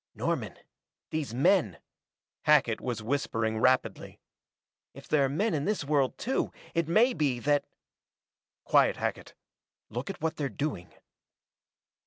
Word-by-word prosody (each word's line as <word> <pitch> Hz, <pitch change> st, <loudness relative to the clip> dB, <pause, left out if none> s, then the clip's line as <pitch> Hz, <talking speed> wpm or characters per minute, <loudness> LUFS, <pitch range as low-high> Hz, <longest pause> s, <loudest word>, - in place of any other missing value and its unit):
"Norman -, -, -2 dB, 0.6 s
these 155 Hz, -6 st, -2 dB
men 130 Hz, -, +2 dB, 0.3 s
" -, -, -65 dB
Hackett 145 Hz, -7 st, +4 dB
was 120 Hz, -4 st, -3 dB
whispering 115 Hz, -3 st, -1 dB
rapidly. 130 Hz, +2 st, +1 dB, 0.8 s
"If -, -, -12 dB
there 145 Hz, -2 st, +3 dB
are -, -, -1 dB
men 195 Hz, +9 st, 0 dB
in 145 Hz, -2 st, -1 dB
this 210 Hz, -4 st, 0 dB
world 140 Hz, -2 st, +1 dB
too, 265 Hz, +4 st, -1 dB, 0.2 s
it 165 Hz, -2 st, 0 dB
may 225 Hz, +9 st, +4 dB
be 145 Hz, -, 0 dB
that 145 Hz, +1 st, +2 dB, 0.5 s
" -, -, -65 dB
"Quiet, -, -, +4 dB
Hackett -, -, -4 dB, 0.6 s
look 120 Hz, -, -4 dB
at 195 Hz, -, -6 dB
what 160 Hz, +1 st, -2 dB
they're 140 Hz, -2 st, -1 dB
doing." 110 Hz, -, -4 dB
145 Hz, 140 wpm, -29 LUFS, 125-160 Hz, 0.8 s, Hackett